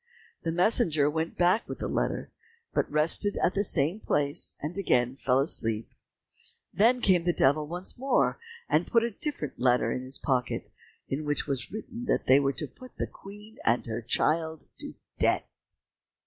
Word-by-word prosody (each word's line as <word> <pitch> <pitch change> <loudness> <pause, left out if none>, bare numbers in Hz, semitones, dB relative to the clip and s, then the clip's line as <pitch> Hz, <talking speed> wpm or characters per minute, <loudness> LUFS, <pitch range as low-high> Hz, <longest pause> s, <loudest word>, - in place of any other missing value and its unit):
The 165 - -2
messenger 170 - +3
went 160 +1 -3
back 180 +5 +2
with - - -5
the - - -4
letter, - - -2 0.4
but - - 0
rested 160 +7 +3
at 180 - +1
the 200 - +1
same 170 +1 +2
place 145 -7 +1
and 150 +4 -5
again 125 -10 +1
fell 130 -1 +1
asleep. 115 -6 +1 0.8
Then 240 +5 +3
came 180 -5 +4
the 175 - +2
Devil 150 -1 +2
once 180 +7 -3
more, 270 +1 +1 0.3
and - - +1
put 230 -1 +3
a 235 - -1
different 200 - -5
letter 125 -2 +2
in 125 - -2
his 130 +1 -3
pocket, 125 -4 -2 0.4
in 140 +3 -3
which 145 0 0
it - - -13
was 135 -3 -3
written 230 +3 -7
that - - 0
they 130 +2 +6
were 140 -1 0
to 150 - -4
put 255 - -15
the - - -1
Queen 210 +3 -13
and 115 +1 +1
her 115 0 -4
child 160 +6 0 0.2
to - - -7 0.2
death. - - +2
155 Hz, 175 wpm, -28 LUFS, 135-200 Hz, 0.8 s, they